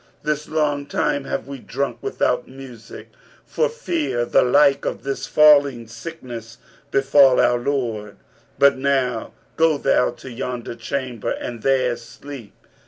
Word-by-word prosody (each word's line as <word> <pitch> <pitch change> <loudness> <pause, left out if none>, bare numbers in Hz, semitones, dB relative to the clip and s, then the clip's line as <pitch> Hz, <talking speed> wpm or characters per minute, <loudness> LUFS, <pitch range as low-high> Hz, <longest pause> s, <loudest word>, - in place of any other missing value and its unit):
This 150 0 -2
long 145 -2 0
time 140 -1 -1
have - - -3
we 140 -1 -7
drunk 130 -2 -3
without 125 0 -1
music, 130 -4 -11 0.4
for 485 - 0
fear 335 - -2
the - - +3
like 140 +2 +4
of - - -4
this 135 0 -3
falling 145 -6 +5
sickness 115 -2 -9 0.3
befal 135 -1 +5
our 120 0 +3
lord. 120 -6 -3 0.4
But 140 -1 +4
now 130 -4 0 0.2
go 160 -2 +3
thou 135 -2 +2
to 120 +2 -10
yonder 120 0 -5
chamber 120 -1 -4
and 120 -2 -5
there 130 -2 +2
sleep.' 120 0 -11
135 Hz, 135 wpm, -21 LUFS, 120-145 Hz, 0.4 s, falling